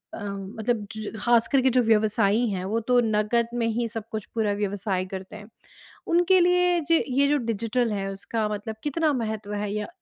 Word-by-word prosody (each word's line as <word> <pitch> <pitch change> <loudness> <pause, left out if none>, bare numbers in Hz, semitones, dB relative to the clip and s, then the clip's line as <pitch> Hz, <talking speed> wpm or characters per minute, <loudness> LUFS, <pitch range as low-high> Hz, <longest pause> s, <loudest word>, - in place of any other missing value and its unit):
अ, - - -8
मतलब 210 +3 -3
ज - - -6
ज - - -11
ख़ासकर 240 +3 +3
के 260 - +3
जो 250 0 +3
व्यवसायी 215 0 +2
हैं 185 -3 -3
वो 215 +4 0
तो 250 -1 +4
नकद 220 +2 +1
में 240 -1 0
ही 230 +1 -1
सब 225 -1 -5
कुछ 220 -2 -4
पूरा 220 -2 +1
व्यवसाय 200 -2 -2
करते 190 +1 -8
हैं। 210 -1 -10 0.6
उनके 350 +2 +4
लिए 360 0 +3
ज 330 - +5
ये 275 +2 +3
जो 295 +1 +3
डिजिटल 230 +2 0
है 195 -1 -2
उसका 215 +3 -2
मतलब 210 +1 -4
कितना 305 +1 +1
महत्त्व 220 -4 -3
है? 205 0 -2
या 210 0 -3
220 Hz, 200 wpm, -25 LUFS, 205-250 Hz, 0.6 s, ज